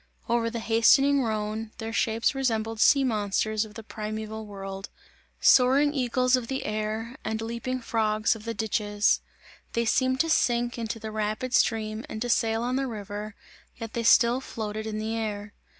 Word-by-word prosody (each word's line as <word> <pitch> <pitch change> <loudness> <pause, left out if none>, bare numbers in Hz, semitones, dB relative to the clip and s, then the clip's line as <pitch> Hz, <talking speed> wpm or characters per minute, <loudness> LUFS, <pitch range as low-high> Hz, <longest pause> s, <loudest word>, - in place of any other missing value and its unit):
Over 230 -1 +1
the 235 - -5
hastening 270 +5 +4
Rhone, 215 -1 -3
their 225 0 -5
shapes 225 +1 +1
resembled 225 -4 -1
sea 275 +4 +5
monsters 215 -2 0
of 210 -1 -14
the 225 - -8
primeval 215 0 -6
world, 195 -1 -7 0.5
soaring 275 +3 +5
eagles 255 -1 +2
of 250 -2 -3
the 265 +1 -3
air 215 +3 -3
and 220 0 -2
leaping 235 +3 -3
frogs 215 -1 +1
of 215 - -11
the 230 0 -4
ditches 205 0 +1 0.5
they 235 0 0
seemed 260 +3 +2
to 330 - 0
sink 240 -3 +1
into 230 0 -3
the 220 -1 -7
rapid 215 +4 -2
stream 220 -2 +1
and 215 - -5
to 245 - -3
sail 225 -1 +1
on 250 +2 0
the 270 0 -1
river, 210 -2 -6 0.4
yet 225 -1 -7
they 235 - -1
still 235 +2 +5
floated 220 -3 -5
in 215 -1 -3
the 220 +1 -2
air. 210 -2 -4
225 Hz, 170 wpm, -27 LUFS, 215-240 Hz, 0.5 s, sea